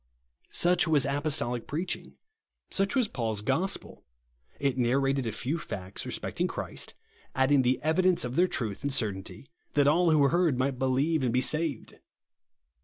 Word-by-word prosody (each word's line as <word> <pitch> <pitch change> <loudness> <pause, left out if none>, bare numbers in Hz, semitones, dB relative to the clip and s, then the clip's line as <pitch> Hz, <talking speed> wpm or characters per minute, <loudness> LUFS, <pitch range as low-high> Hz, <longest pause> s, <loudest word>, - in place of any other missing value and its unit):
Such 175 0 +3
was 150 -4 +3
apostolic 140 -4 -1
preaching. 170 +5 -4 0.6
Such 195 +3 0
was 250 -4 +3
Paul's 110 - -2
gospel. 150 - -1 0.6
It 140 -2 0
narrated 135 +1 +1
a - - -1
few 135 +10 -2
facts 95 -7 -6
re - - -4
specting - - -2
Christ; - - -4 0.4
adding 130 +1 +4
the 130 0 +1
evidence 175 +1 +2
of 125 +1 -5
their 180 +3 +4
truth 115 - -2
and 140 +1 -2
certainty, 110 0 -2 0.3
that 145 -1 +4
all 170 +4 +4
who 155 -2 +4
heard 170 -5 +2
might 130 0 -1
believe 135 +4 +1
and 125 -3 +1
be 125 +2 +2
saved. 155 -4 -1
140 Hz, 155 wpm, -28 LUFS, 125-160 Hz, 0.6 s, adding